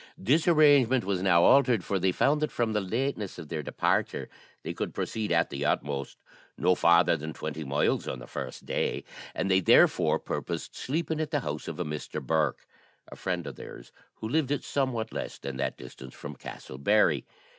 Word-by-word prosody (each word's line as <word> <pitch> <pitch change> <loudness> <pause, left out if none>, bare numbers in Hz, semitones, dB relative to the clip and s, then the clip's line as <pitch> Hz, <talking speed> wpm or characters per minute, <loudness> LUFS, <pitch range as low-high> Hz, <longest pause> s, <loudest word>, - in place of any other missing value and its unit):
This 145 - +2
arrangement 145 -7 +5
was 95 -2 -1
now 85 -3 +4
altered, 125 -8 +5
as 95 -2 +1
they 95 0 +3
found 150 +10 +2
that 155 - 0
from 115 -2 0
the 105 - +1
lateness 110 +1 -2
of 80 -4 -9
their 80 -2 -3
departure - - -1 0.3
they - - -4
could - - -4
proceed, 110 -3 -2
at 85 0 +2
the 70 +1 -3
utmost, 70 -2 -1 0.4
no 90 - +3
farther 85 -1 +4
than 80 0 -6
twenty 80 - -5
miles 70 +1 0
on - - -3
the - - -10
first - - -7
day; - - -1 0.3
and 100 - -1
they, 95 - +5
therefore, 90 - +4
purposed - - -5
sleeping 160 +3 -2
at 155 - -2
the 145 -2 0
house 75 -5 -5
of - - -6
a - - -1
Mr. 75 0 -5
Bourke, 80 -4 0 0.5
a - - -8
friend 90 -3 -3
of 70 -4 -7
theirs, - - -10 0.2
who 110 - -6
lived 145 +2 0
at 145 - -1
somewhat 125 -5 -1
less - - -5
than 70 -1 -6
that 70 - -2
distance 65 -1 -11
from - - -8
Castle 65 - -9
Barry. 105 +9 +3
95 Hz, 195 wpm, -28 LUFS, -, 0.5 s, arrangement